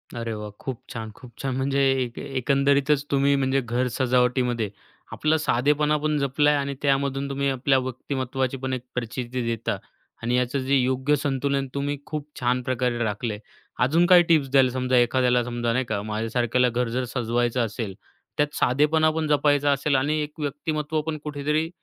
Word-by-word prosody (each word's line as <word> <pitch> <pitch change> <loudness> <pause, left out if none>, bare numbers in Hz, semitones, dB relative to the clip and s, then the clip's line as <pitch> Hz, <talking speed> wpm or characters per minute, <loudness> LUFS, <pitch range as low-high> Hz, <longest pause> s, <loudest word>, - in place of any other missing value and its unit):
अरे 115 -1 -3
वाह! 105 -1 -6
खूप 130 -5 -5
छान, 110 -1 -6
खूप 125 - -13
छान! 135 -2 -2
म्हणजे 135 +1 0 0.2
एक 120 -1 -8
एक 140 -1 -7
एकंदरीतच 140 +2 +2
तुम्ही 140 0 +3
म्हणजे 135 0 +1
घर 120 +1 -1
सजावटीमध्ये 125 -2 +1 0.4
आपला 155 +1 +1
साधेपणा 150 +2 +2
पण 150 0 0
जपला 140 +2 +2
आहे 145 - +3
आणि 140 0 -2
त्यामधून 140 0 0
तुम्ही 140 0 0
आपल्या 135 +1 +2
व्यक्तिमत्त्वाची 130 0 -3
पण 130 0 -3
एक 130 - -2
प्रचिती 125 +1 -3
देता 115 -1 -2 0.5
आणि 120 +1 +1
याचं 125 +2 0
जे 135 +2 +2
योग्य 130 +2 +2
संतुलन 140 -1 -1
तुम्ही 145 +1 -2
खूप 150 -2 -5
छान 125 0 +1
प्रकारे 125 -1 -1
राखलं 110 +1 -2
आहे. 105 - -7 0.5
अजून 165 +6 +3
काही 175 -1 +7
टिप्स 155 -5 +2
द्याल? 135 -1 +5
समजा 130 0 0
एखाद्याला, 125 0 +3
समजा 120 -1 -2
नाही 130 +2 0
का, 110 -3 -2
माझ्यासारख्याला 115 +3 0
घर 120 0 -1
जर 125 +2 -1
सजवायचं 120 0 0
असेल, 105 -2 -5 0.4
त्यात 150 0 0
साधेपणा 150 +5 +3
पण 160 0 -2
जपायचा 145 -1 +3
असेल 140 +1 +1
आणि 145 +4 +1
एक 150 +2 -9
व्यक्तिमत्त्व 150 +1 -2
पण 160 -1 -2
कुठेतरी 150 +2 -1
130 Hz, 175 wpm, -24 LUFS, 125-145 Hz, 0.5 s, काही